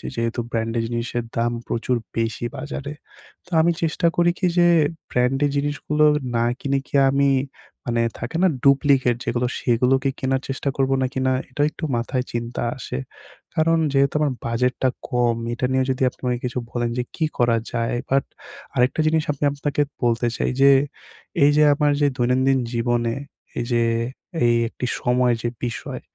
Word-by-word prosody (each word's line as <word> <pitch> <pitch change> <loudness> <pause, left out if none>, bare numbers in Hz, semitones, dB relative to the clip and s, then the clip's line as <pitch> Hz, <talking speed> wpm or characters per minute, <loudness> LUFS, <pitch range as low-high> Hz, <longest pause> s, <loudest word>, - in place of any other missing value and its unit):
যেহেতু 115 +1 -1
ব্র্যান্ড 115 0 -1
এর - - 0
জিনিসের 120 0 -2
দাম 120 +1 +1 0.2
প্রচুর 120 +2 0 0.2
বেশি 115 +1 -1
বাজারে। 145 +1 -5 0.5
তো - - -21
আমি 170 +2 +3
চেষ্টা 165 +2 +1
করি 175 0 +4
কি 185 - +2
যে 175 - +6 0.4
ব্র্যান্ড 125 +2 +1
এর 145 - 0
জিনিসগুলো 145 +1 +1 0.3
না 115 0 +2
কিনে 140 -1 0
কি - - -6
আমি 140 +1 +3 0.6
মানে 115 -1 0 0.2
থাকে 120 +7 -5
না - - +6 0.2
ডুপ্লিকেট 140 -3 +4
যেগুলো 120 0 0
সেগুলো 125 +2 +3
কি 135 - +2
কেনার 130 0 0
চেষ্টা 135 +1 -2
করবো 135 0 +2
নাকি 130 +1 -2
না - - +3 0.2
এটা 130 +3 -3
একটু - - -12
মাথায় 125 +2 -1
চিনতা 120 0 -3
আসে। 95 - -5 0.6
কারণ 165 +1 +3
যেহেতু 140 0 +3
আমার 150 -3 +1
বাজেটটা 125 +2 +1 0.2
কম 120 -2 +2 0.2
এটা 120 - -1
নিয়ে 130 0 +2
যদি 130 - -4
আপনি - - -23
আমাকে 125 -1 -1
কিছু 125 0 -2
বলেন 120 -1 -1
যে 125 - 0
কী 160 - 0
করা 120 -1 +3 0.2
যায়? 115 0 0
বাট 135 0 +3 0.5
আরেকটা 125 +5 +2
জিনিস 160 0 +2
আমি 145 0 -5
আপনাকে 145 0 -1 0.2
বলতে 120 0 +2
চাই - - 0
যে, 140 0 +8 0.7
এইযে 145 +1 +5
আমার 145 0 +2
যে 145 - +5
দৈনন্দিন 130 +2 +2
জীবনে 120 0 0 0.4
এই 120 - -2
যে 120 0 +3 0.6
এই 120 0 +4
একটি 125 - -5 0.2
সময় 125 0 +2
যে 120 - +1 0.2
বিষয় 120 - -5
125 Hz, 170 wpm, -22 LUFS, 120-140 Hz, 0.7 s, যে